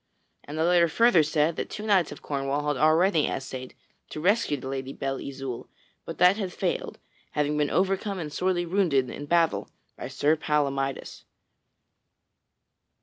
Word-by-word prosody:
And 150 Hz, +2 st, -7 dB
the 160 Hz, -, +1 dB
letter 175 Hz, 0 st, +4 dB
further 230 Hz, +1 st, +4 dB
said 155 Hz, +1 st, +1 dB
that -, -, -3 dB
two 210 Hz, -, -6 dB
knights 195 Hz, -6 st, +3 dB
of -, -, -10 dB
Cornwall 140 Hz, +1 st, -2 dB
had 145 Hz, -, +1 dB
already 160 Hz, +3 st, +3 dB
essayed 130 Hz, -1 st, -5 dB, 0.3 s
to -, -, -6 dB
rescue 190 Hz, -3 st, +2 dB
the 130 Hz, -, -8 dB
Lady 135 Hz, 0 st, -4 dB
Belle 135 Hz, -1 st, -3 dB
Isoult, 135 Hz, -3 st, -6 dB, 0.4 s
but -, -, -7 dB
that 180 Hz, +3 st, +5 dB
they -, -, -6 dB
had 190 Hz, -2 st, -3 dB
failed, -, -, -3 dB, 0.4 s
having 150 Hz, 0 st, 0 dB
been 150 Hz, -1 st, +1 dB
overcome 195 Hz, +1 st, 0 dB
and 155 Hz, -4 st, -5 dB
sorely 180 Hz, 0 st, 0 dB
wounded 165 Hz, -9 st, +1 dB
in 145 Hz, -, -7 dB
battle 170 Hz, 0 st, +1 dB, 0.3 s
by -, -, -6 dB
Sir 145 Hz, +4 st, +1 dB
Palamydes. 140 Hz, -3 st, -2 dB
155 Hz, 160 wpm, -26 LUFS, 140-180 Hz, 0.4 s, that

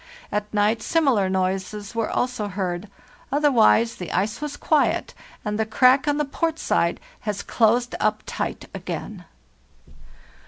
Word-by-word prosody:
At 210 Hz, 0 st, -2 dB
night 215 Hz, +2 st, +2 dB
similar 265 Hz, -, +2 dB
noises 190 Hz, +2 st, -2 dB
were 230 Hz, -1 st, -1 dB
also 245 Hz, -4 st, -1 dB
heard; 185 Hz, 0 st, -3 dB, 0.4 s
otherwise 240 Hz, -5 st, +4 dB
the 180 Hz, -, -6 dB
ice 210 Hz, +8 st, -1 dB
was 295 Hz, -1 st, -4 dB
quiet, 310 Hz, -2 st, +1 dB, 0.3 s
and 210 Hz, 0 st, -2 dB
the 220 Hz, -, +2 dB
crack 255 Hz, +4 st, +4 dB
on 290 Hz, 0 st, +2 dB
the 300 Hz, -, +1 dB
port 325 Hz, +3 st, -1 dB
side -, -, +1 dB, 0.2 s
has 210 Hz, -3 st, -3 dB
closed 240 Hz, +2 st, +2 dB
up 215 Hz, 0 st, 0 dB
tight -, -, -4 dB
again. -, -, -6 dB
220 Hz, 135 wpm, -23 LUFS, 205-265 Hz, 0.4 s, otherwise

